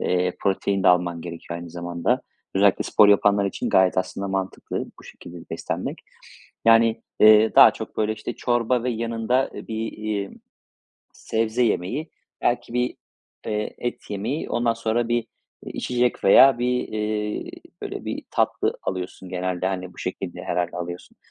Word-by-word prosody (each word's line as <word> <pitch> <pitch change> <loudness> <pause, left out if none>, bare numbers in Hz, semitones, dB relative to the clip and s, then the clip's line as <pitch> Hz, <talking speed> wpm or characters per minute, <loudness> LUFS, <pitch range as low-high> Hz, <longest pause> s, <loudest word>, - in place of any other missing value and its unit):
eee, 90 0 0
protein 100 0 0
de - - +5
alman 90 -1 +2
gerekiyor 85 0 -7
aynı 85 -1 -9
zamanda. 85 0 -1 0.3
Özellikle 100 0 +4
spor 105 - +5
yapanlar 100 0 +4
için 100 - -2
gayet 95 -1 +4
aslında 95 +1 -3
mantıklı 95 0 -3
bu - - -16
şekilde 85 0 -11
beslenmek. - - -4 0.7
Yani, 115 0 +5 0.2
eee, 110 +1 +7
daha - - +9
çok, - - -8
böyle, 110 0 +1
işte, 115 - -5
çorba 120 0 +1
ve 125 - 0
yanında, 115 +2 0
eee, - - -8
bir, 110 0 -3
iii, 105 -2 -3 0.8
sebze 115 +2 -1
yemeği, 120 - -1 0.3
belki 120 -1 0
bir, 125 0 0 0.5
eee, 105 -1 -3
et 120 - -5
yemeği, 110 +9 -3
ondan 120 -1 +1
sonra 115 +1 -1
bir, 120 0 +2 0.5
iii, - - -7
içecek 125 -1 0
veya 130 +6 +7
bir, 125 0 0
eee, 105 -1 -3 0.3
böyle, - - -6
bir - - -4
tatlı - - 0
alıyorsun 95 0 -5
genelde. 90 0 -2
Hani, 90 -1 -4
bu - - -23
şekilde 90 0 -5
herhâlde 90 0 -2
alıyorsun. 85 0 -7
105 Hz, 150 wpm, -24 LUFS, 90-115 Hz, 0.8 s, daha